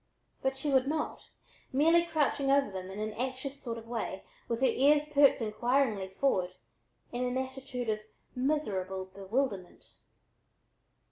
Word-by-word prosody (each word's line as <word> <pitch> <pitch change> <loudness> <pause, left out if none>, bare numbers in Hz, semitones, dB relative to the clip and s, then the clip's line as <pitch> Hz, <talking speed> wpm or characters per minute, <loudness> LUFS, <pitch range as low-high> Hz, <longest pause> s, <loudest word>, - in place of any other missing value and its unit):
But 265 0 0
she 285 +2 -1
would 265 -1 +4
not, 305 +1 -3 0.4
merely 330 +5 +5
crouching 290 -3 +1
over 275 -5 +3
them 185 -1 -5
instead, 190 - -7
in 215 +1 -1
an 215 - -12
anxious 265 +2 -3
sort 235 -2 -4
of 225 0 -10
way 225 -5 -4 0.2
with 230 +1 -2
her - - +5
ears 290 +4 +4
perked 280 -4 +5
inquiringly 225 -2 +1
forward, 190 -3 0 0.6
in 245 +1 -2
an 250 0 -1
attitude 260 -2 -4
of 215 -1 0 0.3
miserable 200 -9 -1
bewilderment. 195 +1 -3
255 Hz, 145 wpm, -31 LUFS, 210-275 Hz, 0.6 s, merely